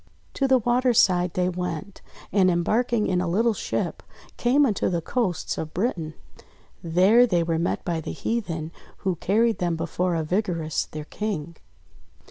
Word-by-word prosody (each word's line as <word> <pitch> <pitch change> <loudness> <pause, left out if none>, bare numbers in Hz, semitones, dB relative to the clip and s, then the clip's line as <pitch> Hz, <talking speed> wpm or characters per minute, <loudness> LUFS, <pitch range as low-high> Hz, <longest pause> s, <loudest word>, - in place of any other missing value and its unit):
To 275 - +1
the 265 -1 +5
water's 245 0 +2
side 180 -1 +3
they 180 0 +1
went, 180 +1 -4 0.3
and 190 -2 +4
embarking 215 +6 +1
in 180 -1 +1
a 180 - -1
little 225 +7 +2
ship, - - -3 0.3
came 270 +4 +3
unto 215 -7 0
the 175 -2 0
coasts 185 -1 -2
of 155 -1 -6
Britain. 170 -6 -2 0.7
There 190 +9 +5
they 175 -6 +2
were 165 -1 -1
met 170 - -1
by 165 -2 -1
the - - -5
heathen, 170 -9 -3 0.3
who 190 -2 +1
carried 225 +6 +1
them 175 -2 0
before 170 +2 -1
Arvigarus 165 -1 -1
their 155 -1 -7
King. 170 -5 -4
180 Hz, 155 wpm, -25 LUFS, 170-225 Hz, 0.7 s, the